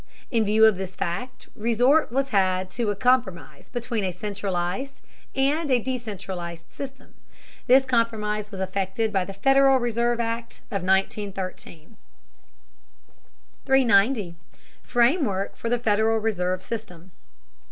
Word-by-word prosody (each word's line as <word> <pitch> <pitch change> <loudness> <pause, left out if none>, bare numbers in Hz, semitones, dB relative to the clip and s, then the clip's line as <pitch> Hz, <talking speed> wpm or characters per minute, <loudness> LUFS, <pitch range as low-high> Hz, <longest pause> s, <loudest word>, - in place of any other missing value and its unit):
In 225 -3 +2
view 215 +2 +5
of 220 -4 +4
this 190 -1 -6
fact 250 +9 -4
resort 245 +7 +2
was 270 +2 0
had 185 -3 +1
to 235 -3 -1
a 205 - 0
compromise 195 - 0
between 240 -3 -3
a 185 - -1
centralized 200 +5 -3 0.4
and 290 +3 +1
a 255 - +4
decentralized 190 -9 -5
system. 270 -1 -9 0.5
This 265 +2 +6
compromise 215 -4 0
was 195 -3 -8
effected 195 +3 -2
by 190 -2 +1
the 195 - -7
Federal 270 +6 +4
Reserve 240 -1 0
Act 230 0 -3
of 200 -3 -2
1913. 190 -3 -2 1.7
390. 230 -7 +3 0.5
FRAMEWORK 240 - +1
OF 230 - -1
THE 245 - +2
FEDERAL 220 -1 +2
RESERVE 185 -4 -1
SYSTEM. 190 -5 -7
220 Hz, 120 wpm, -24 LUFS, 190-245 Hz, 1.7 s, This